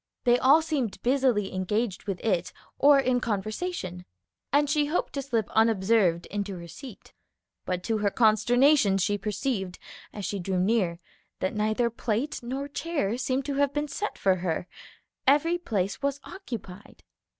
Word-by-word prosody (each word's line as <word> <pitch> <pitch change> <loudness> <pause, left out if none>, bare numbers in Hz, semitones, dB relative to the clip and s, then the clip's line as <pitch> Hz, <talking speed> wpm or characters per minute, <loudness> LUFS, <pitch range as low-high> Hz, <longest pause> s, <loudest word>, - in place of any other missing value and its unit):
They 245 0 +4
all 290 +5 +5
seemed 275 -11 -2
busily 250 -6 +2
engaged 190 +2 -1
with 195 -3 -3
it 185 -6 0 0.3
or 285 0 +7
in 255 -2 +2
conversation, 215 - -3 0.5
and 290 +2 +3
she 295 0 +1
hoped 320 +4 -1
to 280 - -2
slip 235 -6 -1
unobserved 210 -5 +3
into 200 -2 -3
her 170 0 -9
seat. 245 - -12 0.5
But 180 -1 -2
to 225 -2 0
her 205 -1 +2
consternation 235 +1 +4
she 205 +2 0
perceived, 205 -3 -2 0.3
as 205 -2 -6
she 200 - -3
drew 185 0 -1
near, 185 -3 +1 0.4
that 185 - -1
neither 215 +3 +1
plate 235 +5 -2
nor 265 +4 -4
chair 285 -8 -2
seemed 260 +1 -1
to 285 - -2
have 285 -1 +2
been 295 0 -1
set 415 +8 -4
for 190 -1 +2
her; 175 0 -2 0.6
every 325 +5 +4
place 200 - -2
was 280 0 -1
occupied. 205 - -9
225 Hz, 155 wpm, -27 LUFS, 195-275 Hz, 0.6 s, or